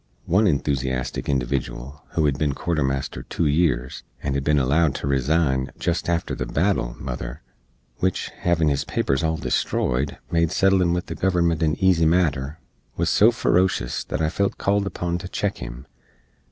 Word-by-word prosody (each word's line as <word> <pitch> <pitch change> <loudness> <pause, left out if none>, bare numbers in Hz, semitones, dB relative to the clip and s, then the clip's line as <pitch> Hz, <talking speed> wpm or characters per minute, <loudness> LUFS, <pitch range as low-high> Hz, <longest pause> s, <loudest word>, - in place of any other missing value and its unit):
One 100 +5 +3
enthoosiastic 65 -5 -1
individual, 65 +1 -2
who 80 - +2
hed 70 -2 +1
bin 75 -2 +1
quartermaster 70 -4 -1
two 85 - -2
years, 70 -5 +1 0.2
and 70 - -1
hed 70 0 -1
bin 75 +1 +2
allowed 70 +3 +2
to - - -4
resign 70 0 +1
"jest 85 0 -1
after 85 -1 -1
the - - -3
battle, 80 -8 0
mother," - - -6 0.6
wich, 95 -1 -1
hevin 85 -3 +2
his 70 -1 0
papers 70 +1 0
all 80 0 +1
destroyed, 70 -2 -1
made 85 -1 +2
settlin 95 -2 +3
with 90 0 -1
the - - -5
government 85 -2 +1
a 80 -1 +2
easy 90 -4 +3
matter, 75 -4 +1 0.4
wuz 85 -1 +1
so 110 - +6
feroshus 95 -6 +1
that - - -2
I 80 - +2
felt 100 +4 -1
called 100 0 +1
upon 85 -2 -2
to 95 - -7
check 100 +1 -2
him. - - -8
80 Hz, 165 wpm, -23 LUFS, 70-85 Hz, 0.6 s, so